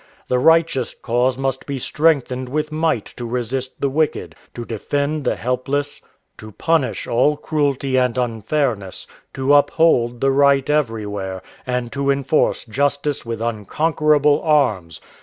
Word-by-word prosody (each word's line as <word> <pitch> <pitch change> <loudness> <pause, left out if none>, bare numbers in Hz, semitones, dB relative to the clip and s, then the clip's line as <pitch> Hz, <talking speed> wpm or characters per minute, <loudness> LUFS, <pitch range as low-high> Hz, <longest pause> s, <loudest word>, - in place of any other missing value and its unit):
The 125 - +2
righteous 160 -4 +2
cause 125 +2 0
must 135 -1 -2
be 140 -1 -3
strengthened 130 -3 +1
with 150 +2 -2
might 155 -8 0
to 120 - -5
resist 125 +2 -3
the 140 - +1
wicked, 155 +2 -1 0.2
to 120 - -6
defend 145 +6 -2
the - - +1
helpless, 135 +4 -2 0.4
to 110 0 -10
punish 160 -1 0
all 145 +5 +2
cruelty 140 -3 -1
and 125 -1 +1
unfairness, 115 -3 -2 0.3
to 135 +2 +2
uphold 140 -5 +3
the 135 +2 +2
right 140 0 +3
everywhere, 105 -9 -2 0.2
and 125 -1 -2
to 140 0 -2
enforce 140 +2 +1
justice 140 +3 -1
with 115 -1 -4
unconquerable 150 - +1
arms. 110 - +1
135 Hz, 135 wpm, -20 LUFS, 120-145 Hz, 0.4 s, uphold